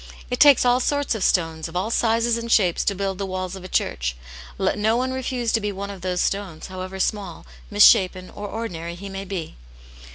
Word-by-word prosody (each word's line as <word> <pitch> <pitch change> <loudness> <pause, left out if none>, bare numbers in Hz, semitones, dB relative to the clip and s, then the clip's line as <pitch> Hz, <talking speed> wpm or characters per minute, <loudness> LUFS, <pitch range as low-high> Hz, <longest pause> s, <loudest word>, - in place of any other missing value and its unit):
It 250 - -1
takes 285 -4 +7
all 245 0 +4
sorts 285 +1 0
of 220 -4 -3
stones, 165 -2 +1
of 165 - -12
all 195 +5 -1
sizes 230 0 +2
and 235 0 -4
shapes, 180 -7 +3
to 200 - +1
build 195 0 -3
the 200 - -2
walls 185 0 -4
of 190 - -10
a - - -7
church - - -1 0.4
i - - -3
let - - +1
no 220 +2 +2
one 255 +1 -1
refuse 250 -3 -2
to 225 - +1
be 205 0 -2
one 200 +1 -5
of 195 -2 -10
those 180 0 -1
stones, 195 -6 -2
however 185 +1 -6
small, 195 -3 -2 0.2
misshapen, 185 -3 +5
or 205 - -7
ordinary 175 -6 -5
he 195 +3 -8
may 195 0 -6
be. 180 - -6
195 Hz, 220 wpm, -23 LUFS, 185-230 Hz, 0.4 s, takes